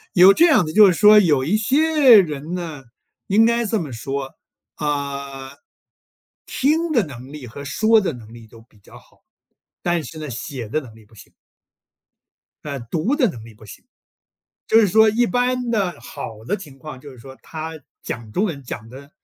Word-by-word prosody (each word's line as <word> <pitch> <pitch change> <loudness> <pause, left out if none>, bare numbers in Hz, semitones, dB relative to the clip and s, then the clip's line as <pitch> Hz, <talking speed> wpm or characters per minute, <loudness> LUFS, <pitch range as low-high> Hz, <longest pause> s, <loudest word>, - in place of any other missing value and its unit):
有 185 +2 +8
这 335 - +5
样 255 - +4
子， 155 - -6
就 210 0 +8
是 185 - +3
说 210 +3 +7
有 150 -9 +2
一 180 +8 +1
些 270 +1 +5
人 155 -2 -3
呢， 160 -6 -6 0.4
应 215 +3 +4
该 235 +1 +1
这 220 0 -1
么 155 -6 -6
说， 135 +3 -5 0.4
啊， 140 -2 -4 1.0
听 315 +5 0
的 235 - +2
能 130 -2 -11
力 150 -3 -9
和 140 +5 -10
说 220 +10 +2
的 190 - -2
能 115 -3 -13
力 115 -1 -13
都 115 +1 -16
比 115 -2 -25
较 100 - -16
好， - - -23 0.6
但 175 -2 0
是 160 - -10
呢， 155 - -6
写 125 0 -6
的 155 +9 -2
能 120 -6 -14
力 110 -1 -18
不 110 - -26
行。 100 - -16 1.3
呃， 140 -2 -5
读 160 - -2
的 260 -7 +2
能 115 -10 -9
力 115 - -14
不 110 +1 -17
行。 100 - -13 0.8
就 225 - +4
是 215 - +4
说 220 +4 +4
一 240 +3 +1
般 250 0 -1
的 195 -6 -1
好 110 -2 -9
的 205 - -1
情 150 -9 -13
况 130 0 -10
就 145 - -12
是 130 - -15
说 130 +3 -13
他 160 0 -7 0.2
讲 115 -2 -7
中 190 - 0
文 160 -9 -4
讲 115 -3 -8
得 135 +4 -13
155 Hz, 205 characters per minute, -20 LUFS, 130-215 Hz, 1.3 s, 有